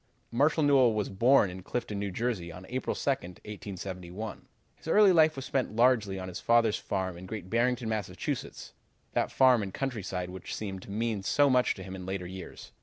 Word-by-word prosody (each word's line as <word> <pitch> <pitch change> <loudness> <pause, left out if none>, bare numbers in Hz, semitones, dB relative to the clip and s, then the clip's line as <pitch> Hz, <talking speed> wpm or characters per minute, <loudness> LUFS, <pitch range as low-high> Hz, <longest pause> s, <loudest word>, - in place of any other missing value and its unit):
"Marshall 145 +6 +3
Newell 130 -6 +5
was 105 -2 -1
born 110 0 +4
in 95 +1 -8
Clifton, 105 0 -3
N. 100 -1 -2
J., 110 -4 -2
on 90 +2 -10
April 130 +2 -2
2, - - -6
1871. 95 -2 -6 0.3
His - - -15
early 205 +3 +6
life 160 -3 +5
was 135 -1 -6
spent 130 -5 -1
largely 115 -5 +3
on 95 0 -5
his 90 -1 -6
father's 115 -2 +3
farm 95 -3 -3
in 95 - -9
Great 95 -3 -7
Barrington, 120 +1 +1
Mass., 110 -3 -1 1.1
that - - 0
farm 130 -3 +5
and 100 -2 -4
countryside 95 -8 -3
which 95 -1 -6
seemed 95 -3 -5
to - - -13
mean 110 0 -1
so 140 +8 +3
much 125 -1 +3
to 95 - -8
him 95 0 -7
in 90 -1 -8
later 95 -1 -3
years. 95 +1 -9
105 Hz, 190 wpm, -29 LUFS, 95-125 Hz, 1.1 s, early